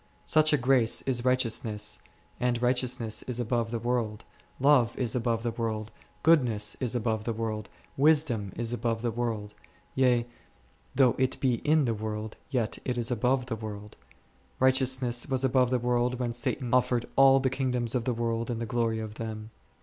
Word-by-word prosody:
Such 155 0 +4
a 150 - +4
grace 125 -3 +3
is 125 -3 -1
righteousness, 115 -4 0 0.4
and 120 -1 0
righteousness 125 -2 0
is 125 -1 -3
above 120 -1 -1
the 115 - -2
world, 115 -2 -2 0.3
love 130 -4 +4
is 120 -3 -1
above 115 -2 0
the 120 - -1
world, 110 -1 -3 0.3
goodness 120 -10 +3
is 125 -2 -1
above 110 -2 -1
the 115 - -2
world, 110 -2 -4 0.3
wisdom 140 -9 +2
is 120 +1 -3
above 115 -1 -2
the 120 - 0
world; 110 -3 -3 0.4
yea, 125 -3 +2 0.7
though 130 -3 +5
it 130 0 0
be 125 -3 +1
in 150 +3 +2
the 115 - 0
world, 110 0 -5
yet 125 -6 -1
is 120 -1 -1
it - - +3
above 125 +2 +1
the 125 -3 -3
world. 105 -1 -8 0.6
Righte 130 +1 +4
ousness 125 -1 -1
was 130 -1 0
above 130 -1 +3
the 130 - +2
world 125 +1 0
when 120 -2 -2
Satan 120 +1 -1
offered 125 -1 +2
all 135 0 +6
the 130 -1 0
kingdoms 125 -3 -1
of 125 -3 -1
the 125 - 0
world 115 0 -2
and 120 -2 -2
the 115 - -3
glory 115 0 0
of 110 -1 -5
them. 110 -1 -6
120 Hz, 180 wpm, -28 LUFS, 115-130 Hz, 0.7 s, all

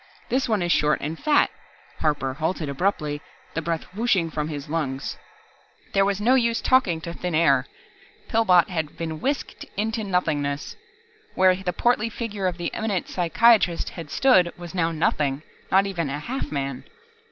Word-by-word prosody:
"This 260 -1 0
one 210 -5 +1
is 175 - 0
short 150 -3 +3
and 155 +3 -4
fat 300 -1 +3 0.3
" - - -28
Harper 145 -4 0
halted 160 +2 -2
abruptly, 150 -1 -1 0.3
the 165 - -1
breath 165 0 -2
whooshing 195 -6 +1
from 150 -1 -2
his 145 -3 -6
lungs. 145 -4 -2 0.8
There 195 - +4
was 200 0 0
no 235 +5 +3
use 235 -3 +2
talking 200 -11 +2
to 170 0 -6
thin 180 -1 -3
air. 140 -5 +3 0.6
Pillbot 185 -7 +4
had 160 -5 -3
been 160 -2 -4
whisked 280 +2 -2
into 220 +2 -1
nothingness. 150 -7 -1 0.6
Where 185 0 +5
the 185 -1 -3
portly 230 +3 +1
figure 210 -5 -3
of 175 -2 -2
the 175 -1 -3
eminent 210 -5 -2
psychiatrist 185 +1 +3
had 165 -4 -9
stood 185 - +4
was 175 -2 -9
now 165 -3 +1
nothing, 150 -3 0 0.3
not 195 +1 +5
even 170 -7 -2
a 140 - -2
half 245 - -4
man. 135 -3 -3
175 Hz, 165 wpm, -24 LUFS, 155-205 Hz, 0.8 s, Where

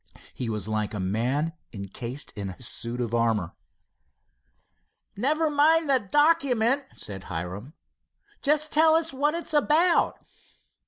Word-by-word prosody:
He 125 - -5
was 105 -3 -4
like 110 -1 -2
a - - -4
man 125 - -1 0.2
encased 115 +7 -5
in 100 -3 -5
a 90 - -10
suit 120 0 -2
of 120 -1 -3
armor. 115 -7 0 1.6
"Never 305 +9 +1
mind 305 +1 +3
the 265 - +5
document," 275 - +2
said 95 -2 -7
Hiram. 90 - -6 0.7
"Just 300 +1 +2
tell 315 +1 +5
us 325 -2 +1
what 295 +4 0
it's 335 -1 -3
about." 315 +4 +3
165 Hz, 125 wpm, -26 LUFS, -, 1.6 s, the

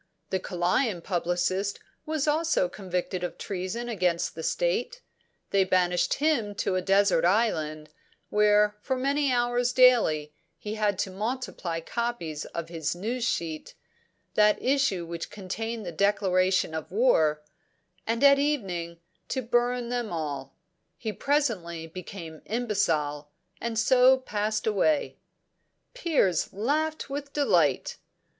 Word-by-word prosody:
The 190 - +1
Kalayan 180 +2 0
publicist 180 +2 -1 0.3
was 310 -1 -1
also 315 - +2
convicted 180 -1 -4
of 180 - -4
treason 195 +5 -4
against 180 -7 0
the 160 - -7
state; - - -1 0.5
they 195 -1 +4
banished 180 -2 +2
him 275 -9 0
to 195 - -1
a 185 - +1
desert 195 -1 +3
island, 155 -6 +1 0.4
where 210 0 +4
for 260 - -1
many 280 +1 +1
hours 245 0 +1
daily 225 -13 +4 0.2
he 210 - -5
had 210 -2 0
to 190 - -10
multiply 200 -5 -3
copies 175 -7 -3
of 170 -1 -5
his 160 -1 -2
news 230 +7 -3
sheet 160 -8 -3 0.6
that 210 0 +4
issue 260 -10 +1
which 170 0 -6
contained 220 +3 -5
the 175 - -4
declaration 185 -1 +2
of 160 0 -5
war 160 -9 +3 0.6
and 230 +3 0
at 280 0 +7
evening 190 - -1 0.3
to 260 - -2
burn 240 +1 0
them 240 -4 -2
all. 145 -5 -4 0.4
He 220 -2 -4
presently 205 - -1
became 165 -1 -9
imbecile, 155 -11 -1 0.3
and 230 -1 -3
so 255 +2 +5
passed 215 -4 -2
away.'" 225 +9 +1 0.7
Piers 310 - +1
laughed 305 +10 -1
with 280 +1 -6
delight. 290 -1 +2
205 Hz, 125 wpm, -27 LUFS, 175-245 Hz, 0.7 s, at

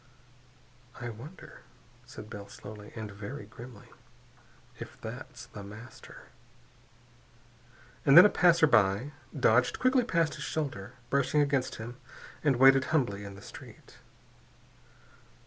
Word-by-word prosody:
"I 120 0 -5
wonder," 130 +11 -11 0.5
said - - -10
Bell 105 -3 -9
slowly, 105 0 -11
and 110 -2 -6
very 105 +5 -8
grimly, 115 -1 -12 0.9
"if 120 - -9
that's 120 +1 -8
The 105 -4 -10
Master?" 105 +5 -12 1.7
And 140 +3 +6
then 175 - +12
a - - +7
passerby 145 - +4 0.3
dodged 125 -1 +3
quickly 255 0 +3
past 165 -8 +1
his - - -7
shoulder, 130 -8 -4 0.2
brushing 140 +2 +2
against 140 -3 0
him, 120 +2 -8 0.5
and 145 -4 +3
waited 135 +2 +6
humbly 120 -11 0
in 100 -1 -9
the 100 - -13
street. - - -13
125 Hz, 115 wpm, -30 LUFS, 105-145 Hz, 1.7 s, then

